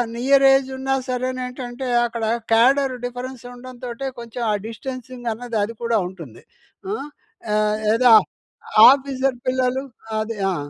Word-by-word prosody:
నియరేజున్నా 270 Hz, +1 st, +3 dB
సరేనేంటంటే 255 Hz, 0 st, -4 dB, 0.2 s
అక్కడ 230 Hz, -1 st, -3 dB, 0.3 s
cadre 260 Hz, +4 st, +4 dB
difference 245 Hz, 0 st, -6 dB
ఉండంతోటే 250 Hz, +1 st, -7 dB
కొంచెం 235 Hz, +1 st, -7 dB
ఆ -, -, +1 dB
డిస్టెన్సింగన్నది 245 Hz, 0 st, -5 dB
అది 230 Hz, +3 st, -4 dB
కూడా 235 Hz, -1 st, +1 dB
ఉంటుంది. 165 Hz, -11 st, -11 dB, 0.5 s
ఆ! -, -, 0 dB, 0.6 s
ఆహ్, 210 Hz, 0 st, +1 dB, 0.2 s
ఏ -, -, +3 dB
దా 245 Hz, -2 st, +8 dB, 0.8 s
ఆఫీసర్ 270 Hz, -1 st, +1 dB
పిల్లలు 255 Hz, +1 st, 0 dB, 0.4 s
అదే 215 Hz, 0 st, -4 dB
ఆ! -, -, -1 dB
250 Hz, 110 wpm, -21 LUFS, 230-260 Hz, 0.8 s, దా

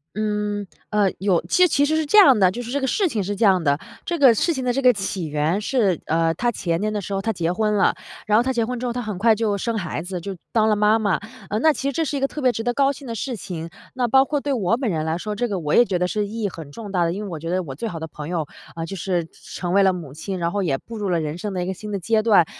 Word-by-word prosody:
嗯， 210 Hz, -1 st, -2 dB, 0.2 s
呃 205 Hz, -2 st, +3 dB
有， 190 Hz, -3 st, +2 dB
其 360 Hz, 0 st, +5 dB
其 285 Hz, -2 st, +2 dB
实 310 Hz, +2 st, +1 dB
是 315 Hz, -1 st, +1 dB
这 420 Hz, +9 st, +6 dB
样 270 Hz, -, +8 dB
的， 185 Hz, -1 st, +5 dB
就 240 Hz, -, -5 dB
是 240 Hz, -, -7 dB
这 285 Hz, -, 0 dB
个 265 Hz, -, -1 dB
事 385 Hz, -, +1 dB
情 220 Hz, -, -1 dB
是 205 Hz, +2 st, -3 dB
这 215 Hz, -, -1 dB
样 185 Hz, -4 st, +4 dB
的， 140 Hz, -1 st, +2 dB, 0.3 s
这 340 Hz, -2 st, -2 dB
个 265 Hz, -4 st, +7 dB
事 335 Hz, -, +1 dB
情 260 Hz, -2 st, -3 dB
的 250 Hz, -, +1 dB
这 265 Hz, -, 0 dB
个 255 Hz, -2 st, +5 dB
起 195 Hz, -3 st, -3 dB
源 150 Hz, +5 st, 0 dB
是 210 Hz, -, +1 dB
呃， 165 Hz, 0 st, +2 dB
她 240 Hz, +5 st, 0 dB
前 170 Hz, -5 st, -2 dB
年 215 Hz, +1 st, -1 dB
的 205 Hz, -, -2 dB
时 195 Hz, +1 st, -4 dB
候 195 Hz, -, -1 dB
她 225 Hz, +2 st, -1 dB
结 170 Hz, -2 st, -1 dB
婚 210 Hz, +2 st, 0 dB
了， 195 Hz, -, +3 dB, 0.3 s
然 210 Hz, 0 st, +4 dB
后 235 Hz, -, +4 dB
她 260 Hz, 0 st, 0 dB
结 235 Hz, -, +1 dB
婚 245 Hz, +1 st, -3 dB
之 250 Hz, -, -4 dB
后， 240 Hz, -, -1 dB
她 245 Hz, -, -3 dB
很 210 Hz, -5 st, -4 dB
快 225 Hz, +3 st, +4 dB
就 215 Hz, -2 st, 0 dB
生 230 Hz, +3 st, -2 dB
孩 170 Hz, -5 st, -3 dB
子， 180 Hz, -1 st, -5 dB
就 195 Hz, +1 st, -5 dB, 0.2 s
当 220 Hz, -1 st, +3 dB
了 215 Hz, -, +3 dB
妈 210 Hz, +2 st, +3 dB
妈。 205 Hz, -4 st, +1 dB, 0.3 s
呃， 210 Hz, -, -1 dB
那 315 Hz, +1 st, +5 dB
其 275 Hz, -, -3 dB
实 -, -, -1 dB
这 325 Hz, +4 st, -1 dB
是 285 Hz, 0 st, -3 dB
一 -, -, 0 dB
个 275 Hz, -, +1 dB
特 300 Hz, -, -7 dB
别 250 Hz, -, +5 dB
值 225 Hz, 0 st, -4 dB
得 245 Hz, -, +1 dB
高 275 Hz, 0 st, +3 dB
兴 275 Hz, -1 st, -11 dB
的 230 Hz, -, -4 dB
事 250 Hz, +2 st, -3 dB
情， 170 Hz, -5 st, -6 dB, 0.2 s
那 250 Hz, -2 st, +1 dB
包 265 Hz, +3 st, +5 dB
括 290 Hz, +1 st, -1 dB
对 280 Hz, 0 st, -2 dB
我 225 Hz, -2 st, +1 dB
本 255 Hz, -2 st, -2 dB
人 155 Hz, -2 st, -1 dB
来 160 Hz, +1 st, -1 dB
说， 210 Hz, +3 st, -4 dB
这 245 Hz, +3 st, -1 dB
个 200 Hz, -4 st, -2 dB
我 150 Hz, -2 st, -2 dB
也 240 Hz, -, +7 dB
觉 195 Hz, -6 st, -1 dB
得 180 Hz, 0 st, +1 dB
是 210 Hz, +2 st, -1 dB
意 220 Hz, +2 st, -5 dB
义 -, -, +2 dB
很 160 Hz, -6 st, -9 dB
重 210 Hz, +4 st, -8 dB
大 180 Hz, -3 st, +2 dB
的， 165 Hz, -, 0 dB
因 200 Hz, +4 st, -4 dB
为 200 Hz, -, -6 dB
我 165 Hz, -, -5 dB
觉 165 Hz, +2 st, -5 dB
得 185 Hz, +1 st, 0 dB
我 135 Hz, -5 st, -7 dB
最 220 Hz, -, -4 dB
好 165 Hz, -, -6 dB
的 160 Hz, -, -4 dB
朋 150 Hz, +1 st, -8 dB
友 165 Hz, -4 st, -1 dB, 0.3 s
呃， 165 Hz, 0 st, -4 dB
就 195 Hz, -, -6 dB
是 175 Hz, -1 st, -1 dB
成 165 Hz, -, -12 dB
成 175 Hz, 0 st, 0 dB
为 200 Hz, -, +5 dB
了 190 Hz, -, +5 dB
母 160 Hz, -7 st, -7 dB
亲， 185 Hz, +5 st, -5 dB
然 170 Hz, -1 st, -1 dB
后 205 Hz, -, -1 dB
也 150 Hz, -8 st, 0 dB
步 230 Hz, -, -10 dB
入 200 Hz, -2 st, -2 dB
了 170 Hz, -, +1 dB
人 155 Hz, 0 st, -3 dB
生 205 Hz, +2 st, -4 dB
的 180 Hz, -1 st, -2 dB
一 -, -, -3 dB
个 190 Hz, -, -2 dB
新 210 Hz, +3 st, -9 dB
的 200 Hz, -, -1 dB
阶 215 Hz, +4 st, +1 dB
段。 205 Hz, -7 st, +5 dB
205 Hz, 355 characters per minute, -22 LUFS, 175-240 Hz, 0.3 s, 样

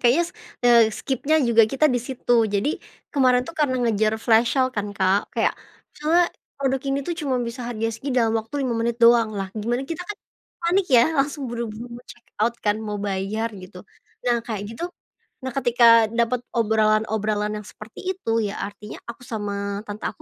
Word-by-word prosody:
kayaknya, 255 Hz, +8 st, +4 dB, 0.4 s
eee, 235 Hz, -1 st, +7 dB
skip-nya 275 Hz, +6 st, 0 dB
juga 230 Hz, -1 st, +6 dB
kita 290 Hz, +3 st, +4 dB
di 250 Hz, -4 st, +1 dB
situ. 245 Hz, -1 st, -1 dB, 0.2 s
Jadi, 200 Hz, +9 st, +1 dB, 0.4 s
kemarin 255 Hz, -3 st, +4 dB
tuh 335 Hz, -, -8 dB
karena 280 Hz, -4 st, +2 dB
ngejar 215 Hz, -1 st, +2 dB
flash 230 Hz, +1 st, +4 dB
sale 260 Hz, -1 st, +3 dB
kan 205 Hz, -1 st, -2 dB
Kak, 190 Hz, +2 st, +1 dB
kayak, -, -, +1 dB, 0.4 s
misalnya 330 Hz, +4 st, +3 dB, 0.3 s
produk 270 Hz, -1 st, 0 dB
ini 275 Hz, 0 st, +1 dB
tuh 345 Hz, -, -1 dB
cuma 280 Hz, -4 st, -1 dB
bisa 235 Hz, +1 st, -4 dB
harga 225 Hz, -2 st, -2 dB
segini, 265 Hz, +4 st, -4 dB
dalam 225 Hz, -2 st, +2 dB
waktu 225 Hz, +4 st, -9 dB
5 240 Hz, -, -1 dB
menit 235 Hz, 0 st, 0 dB
doang. 235 Hz, -1 st, +5 dB
Lah, 195 Hz, -1 st, -3 dB
gimana 235 Hz, +4 st, -1 dB
kita 330 Hz, +3 st, -4 dB
kan, 415 Hz, -, -4 dB, 0.4 s
panik 355 Hz, +3 st, +2 dB
ya, 240 Hz, -1 st, +7 dB
langsung 285 Hz, +1 st, 0 dB
buru-buru 235 Hz, -1 st, -5 dB
mau 245 Hz, +1 st, -11 dB
check 240 Hz, -, -14 dB, 0.2 s
out 235 Hz, +1 st, +2 dB
kan. 210 Hz, 0 st, +2 dB
Mau 210 Hz, -1 st, -4 dB
bayar, 200 Hz, +3 st, -2 dB
gitu. 185 Hz, 0 st, -11 dB, 0.5 s
Nah, 240 Hz, -1 st, +2 dB
kayak 220 Hz, -3 st, -4 dB
gitu 335 Hz, -, -4 dB, 0.6 s
nah 260 Hz, -, -3 dB
ketika 235 Hz, -3 st, +5 dB
dapat 235 Hz, +2 st, -1 dB
obrolan-obrolan 215 Hz, -1 st, +1 dB
yang 210 Hz, -, -8 dB
seperti 225 Hz, -, -6 dB
itu, 230 Hz, -12 st, -1 dB
ya 200 Hz, -, -4 dB
artinya 205 Hz, +1 st, -7 dB
aku 245 Hz, +2 st, -9 dB
sama 200 Hz, -2 st, -3 dB
tante 205 Hz, +1 st, -6 dB
aku, 205 Hz, -, -5 dB
235 Hz, 180 wpm, -23 LUFS, 215-260 Hz, 0.6 s, eee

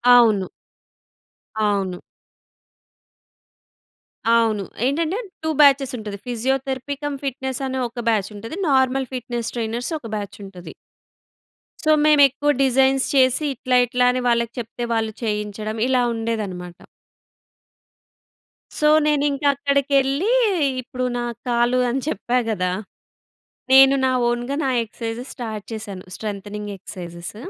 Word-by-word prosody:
అవును. 215 Hz, -6 st, +4 dB, 1.2 s
అవును. 195 Hz, -3 st, 0 dB, 2.3 s
అవును. 225 Hz, -3 st, +2 dB, 0.2 s
ఏంటంటే 325 Hz, +8 st, 0 dB, 0.3 s
2 315 Hz, -, -1 dB
బ్యాచెసుంటది. 255 Hz, -7 st, +3 dB
ఫిజియోథెరపీ 265 Hz, +3 st, -2 dB
కమ్ 290 Hz, -1 st, -2 dB
ఫిట్నెస్ 265 Hz, 0 st, -3 dB
అనే 260 Hz, 0 st, -3 dB
ఒక 240 Hz, 0 st, -6 dB
బ్యాచుంటది. 215 Hz, -, -2 dB
నార్మల్ 265 Hz, -1 st, +2 dB
ఫిట్నెస్ 240 Hz, -2 st, -4 dB
ట్రైనర్స్ 235 Hz, +5 st, -3 dB
ఒక 230 Hz, -, -9 dB
బ్యాచుంటది. 195 Hz, -4 st, -8 dB, 1.1 s
సో, 310 Hz, -, +3 dB
మేమెక్కువ 290 Hz, -1 st, +5 dB
డిజైన్స్ 265 Hz, 0 st, +3 dB
చేసి 260 Hz, +2 st, +4 dB
ఇట్లా, 255 Hz, +1 st, -1 dB
ఇట్లా 250 Hz, +1 st, +1 dB
అని 255 Hz, -, -2 dB
వాళ్ళకి 235 Hz, -1 st, +1 dB
చెప్తే 240 Hz, +1 st, -5 dB
వాళ్ళు 220 Hz, -1 st, -1 dB
చేయించడం 210 Hz, 0 st, -3 dB
ఇలా 255 Hz, -1 st, +2 dB
ఉండేదనమాట. 205 Hz, -6 st, -4 dB, 2.0 s
సో 300 Hz, -, +4 dB, 0.2 s
నేనింక 290 Hz, -1 st, +1 dB
అక్కడికెళ్ళి 280 Hz, -, +1 dB, 0.5 s
ఇప్పుడు 255 Hz, +1 st, -4 dB
నా 240 Hz, -, -2 dB, 0.2 s
కాలు 240 Hz, +1 st, +2 dB
అని 265 Hz, +3 st, -1 dB
చెప్పా 245 Hz, -2 st, -1 dB
గదా! 185 Hz, -4 st, 0 dB, 1.0 s
నేను 270 Hz, +1 st, +8 dB
నా 260 Hz, -, +3 dB, 0.2 s
ఓన్‌గా 240 Hz, +3 st, -2 dB
నా 265 Hz, -, +1 dB
ఎక్సర్‌సైజెస్ 230 Hz, +3 st, -6 dB
స్టార్ట్ 220 Hz, -5 st, -6 dB
చేశాను. 205 Hz, -4 st, -7 dB
Strengthening 210 Hz, 0 st, -5 dB
exercises. 175 Hz, 0 st, -8 dB
240 Hz, 105 wpm, -22 LUFS, 215-270 Hz, 2.3 s, నేను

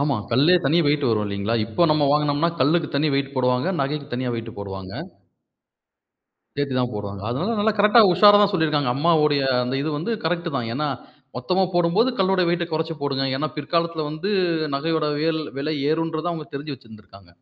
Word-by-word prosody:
ஆமா. 140 Hz, -2 st, +1 dB, 0.2 s
கல்லே 145 Hz, +9 st, +4 dB
தனியா 165 Hz, +5 st, +3 dB
வெயிட் 145 Hz, -1 st, +1 dB
வரும் 110 Hz, -2 st, +1 dB
இல்லீங்களா? 100 Hz, +2 st, -2 dB
இப்போ 115 Hz, +9 st, -1 dB
நம்ம 150 Hz, -2 st, +2 dB
வாங்குனோம்னா 150 Hz, +2 st, +1 dB
கல்லுக்கு 155 Hz, +4 st, +2 dB
தனியா 145 Hz, -1 st, +1 dB
வெயிட் 140 Hz, 0 st, -3 dB
போடுவாங்க, 125 Hz, +4 st, +1 dB
நகைக்கு 140 Hz, +1 st, -2 dB
தனியா 125 Hz, 0 st, -2 dB
வெயிட் 115 Hz, -2 st, -7 dB
போடுவாங்க. 95 Hz, -1 st, -7 dB, 1.6 s
சேர்த்து 145 Hz, -2 st, -2 dB
தான் 125 Hz, -1 st, 0 dB
போடுவாங்க. 100 Hz, -1 st, -6 dB
அதனால 175 Hz, -, -2 dB
நல்லா 215 Hz, +2 st, +2 dB
கரெக்டா 210 Hz, +3 st, +6 dB
உஷாராதான் 205 Hz, +2 st, +6 dB
சொல்லிருக்காங்க, 150 Hz, -7 st, +1 dB
அம்மாவோடைய 150 Hz, -2 st, +2 dB, 0.2 s
அந்த 125 Hz, +2 st, -3 dB
இது 155 Hz, -, -2 dB
வந்து 170 Hz, +10 st, -3 dB
கரெக்ட்டுதான். 165 Hz, -7 st, -2 dB
ஏன்னா, 150 Hz, +5 st, -2 dB, 0.5 s
மொத்தமா 180 Hz, +10 st, 0 dB
போடும்போது 175 Hz, +7 st, +2 dB
கல்லோட 190 Hz, 0 st, +2 dB
வெயிட்ட 175 Hz, 0 st, 0 dB
குறைச்சு 160 Hz, +1 st, -2 dB
போடுங்க. 135 Hz, -1 st, -1 dB
ஏன்னா 155 Hz, +3 st, -1 dB
பிற்காலத்துல 165 Hz, +1 st, -1 dB
வந்து 155 Hz, +7 st, -4 dB, 0.4 s
நகையோட 160 Hz, +2 st, -1 dB
வியல் 160 Hz, 0 st, 0 dB, 0.2 s
விலை 150 Hz, +3 st, -2 dB, 0.2 s
ஏறும்ன்றத 165 Hz, +1 st, -1 dB
அவங்க 155 Hz, -3 st, -7 dB
தெரிஞ்சு 145 Hz, +1 st, -6 dB
வச்சிருந்துருக்காங்க. 105 Hz, -6 st, -17 dB
150 Hz, 160 wpm, -22 LUFS, 130-170 Hz, 1.6 s, கரெக்டா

